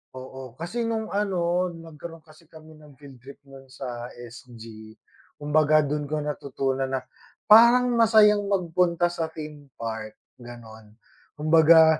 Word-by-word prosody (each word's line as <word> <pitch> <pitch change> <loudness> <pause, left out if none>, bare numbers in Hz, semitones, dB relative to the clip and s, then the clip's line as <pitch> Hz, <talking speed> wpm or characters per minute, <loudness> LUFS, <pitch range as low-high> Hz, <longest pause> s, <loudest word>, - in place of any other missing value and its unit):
oo, 130 -1 -10
kasi 225 - -4
nung 220 -1 -3
ano 180 -3 0
nagkaroon 165 0 -11
kasi 155 +1 -20
kami 155 -1 -16
ng 150 -2 -17
field 135 -2 -15
trip 135 +3 -14
no'n 135 -1 -15
sa 125 -2 -7
SG 115 -2 -12 0.4
kumbaga 155 +1 +2
do'n 145 0 -3
ko 150 +1 -3
natutunan 135 -2 -3
na 130 -1 -3 0.5
parang 240 +3 +7
masayang 215 -3 +4
magpunta 175 -2 0
sa 165 -2 -3
theme 150 -2 -10
park 110 -2 -6 0.2
gano'n. 110 -3 -13 0.4
Kumbaga, 160 +1 +5
150 Hz, 130 wpm, -24 LUFS, 130-170 Hz, 0.5 s, parang